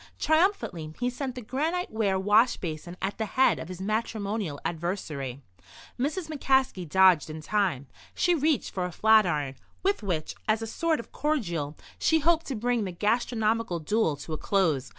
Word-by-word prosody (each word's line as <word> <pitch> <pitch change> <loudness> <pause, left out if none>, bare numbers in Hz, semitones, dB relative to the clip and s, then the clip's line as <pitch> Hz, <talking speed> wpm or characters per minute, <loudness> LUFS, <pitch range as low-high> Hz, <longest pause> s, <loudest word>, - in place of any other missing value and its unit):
Triumphantly 315 - +1
he 245 0 0
sent 255 0 -4
the 250 - -6
granite 315 +10 -2
ware 205 -3 +1
wash 210 +5 +4
basin 175 +1 -6
at 195 +3 -2
the 220 - -1
head 265 - +4
of - - -6
his 185 0 -8
matrimonial 210 -5 -2
adversary. 155 -6 -3 0.6
Mrs. 310 +6 -1
McCaskey 265 - +1
dodged 185 -3 +5
in 155 +1 -6
time. 175 -5 0 0.3
She 355 - +3
reached 310 -2 +1
for 185 -2 -1
a 180 - -4
flatiron, 175 -11 +3 0.3
with 395 -5 +1
which, 175 -7 -2
as 220 +1 +2
a - - -2
sort 320 +8 0
of 235 - -9
cordial, 170 - -2 0.2
she 320 - +3
hoped 330 +1 +2
to 270 - -3
bring 240 0 0
the 190 - -3
gastronomical 220 0 0
duel 165 0 +1
to 155 +3 -7
a 155 - -4
close. 160 - +1
210 Hz, 170 wpm, -27 LUFS, 170-255 Hz, 0.6 s, dodged